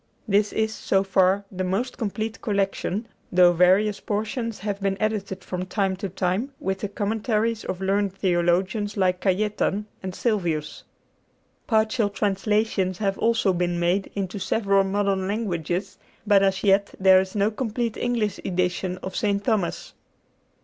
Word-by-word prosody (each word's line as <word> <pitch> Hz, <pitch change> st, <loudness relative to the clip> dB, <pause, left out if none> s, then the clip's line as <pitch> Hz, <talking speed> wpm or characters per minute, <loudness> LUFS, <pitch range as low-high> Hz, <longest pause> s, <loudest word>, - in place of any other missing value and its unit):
This 205 Hz, 0 st, +2 dB
is, 220 Hz, 0 st, 0 dB
so 195 Hz, -2 st, +1 dB
far, 195 Hz, +1 st, +2 dB
the 185 Hz, -1 st, -3 dB
most 195 Hz, +8 st, -1 dB
complete 220 Hz, 0 st, -3 dB
collection, 200 Hz, 0 st, -1 dB, 0.2 s
though 180 Hz, -1 st, +6 dB
various 190 Hz, +4 st, +3 dB
portions 220 Hz, +2 st, -3 dB
have 200 Hz, -1 st, -4 dB
been 195 Hz, 0 st, 0 dB
edited 200 Hz, -3 st, -2 dB
from 185 Hz, 0 st, -4 dB
time 195 Hz, -1 st, 0 dB
to 195 Hz, +1 st, -4 dB
time 190 Hz, +8 st, -1 dB
with 190 Hz, 0 st, -2 dB
the 205 Hz, -, -3 dB
commentaries 220 Hz, +2 st, -1 dB
of 185 Hz, -, -4 dB
learned 200 Hz, +1 st, +1 dB
theologians 190 Hz, +3 st, 0 dB
like 185 Hz, -2 st, +1 dB
Cajetan 205 Hz, +1 st, 0 dB, 0.2 s
and 185 Hz, -1 st, -5 dB
Sylvius. 175 Hz, -10 st, -1 dB, 0.8 s
Partial 220 Hz, -1 st, +2 dB
translations 205 Hz, -2 st, 0 dB
have 195 Hz, -1 st, -1 dB
also 225 Hz, -4 st, +2 dB
been 175 Hz, 0 st, -1 dB
made 175 Hz, +3 st, +1 dB
into 195 Hz, 0 st, -3 dB
several 195 Hz, -1 st, +2 dB
modern 195 Hz, -1 st, 0 dB
languages; 185 Hz, -4 st, -2 dB, 0.3 s
but 205 Hz, -2 st, +5 dB
as 195 Hz, -1 st, +1 dB
yet 200 Hz, 0 st, +3 dB
there 190 Hz, -1 st, +6 dB
is 190 Hz, +1 st, -7 dB
no 205 Hz, +1 st, +2 dB
complete 230 Hz, 0 st, -2 dB
English 230 Hz, -5 st, -1 dB
edition 180 Hz, 0 st, -1 dB
of 190 Hz, -, -5 dB
St. 200 Hz, -1 st, 0 dB
Thomas. 215 Hz, -8 st, -1 dB
195 Hz, 145 wpm, -24 LUFS, 185-215 Hz, 0.8 s, though